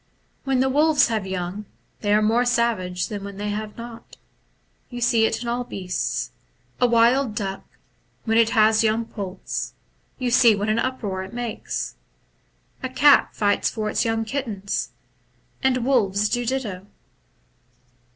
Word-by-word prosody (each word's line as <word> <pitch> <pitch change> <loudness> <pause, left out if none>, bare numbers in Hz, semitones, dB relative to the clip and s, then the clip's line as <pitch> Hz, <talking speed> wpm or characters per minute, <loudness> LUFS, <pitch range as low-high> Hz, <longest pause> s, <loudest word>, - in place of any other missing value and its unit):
« - - -42
When 265 -2 +2
the 265 - +3
wolves 295 0 +4
have 215 -4 -2
young, 190 +2 -4 0.3
they 205 - -1
are 210 +1 +4
more 225 +3 +3
savage 225 -7 0
than 205 -2 -6
when 200 -1 -8
they 205 +1 -3
have 210 0 -4
not. 235 0 -10 0.7
You 245 - -6
see 235 -2 +3
it 225 - -1
so - - -7
in - - -6
all 240 +1 -1
beasts. 185 -6 -3 0.5
A 245 - +4
wild 235 0 +3
duck, 195 -2 -3 0.6
when 225 0 +3
it 225 -1 +4
has 220 0 +4
young 225 +1 +1
poults, 195 -4 -5 0.4
you 250 -2 -1
see 235 -2 +6
what 205 +2 -2
an 215 +2 +2
uproar 215 -8 -2
it 190 - -10
makes. 230 - -4 0.8
A 260 - -3
cat 285 +3 +5
fights 205 -1 +1
for 215 -1 -3
its - - +1
young 225 -1 0
kittens; 220 -6 -3 0.7
the 260 -1 +2
wolves 210 -5 +2
do 245 0 -1
ditto. 215 -7 -3
225 Hz, 160 wpm, -23 LUFS, 205-245 Hz, 0.8 s, see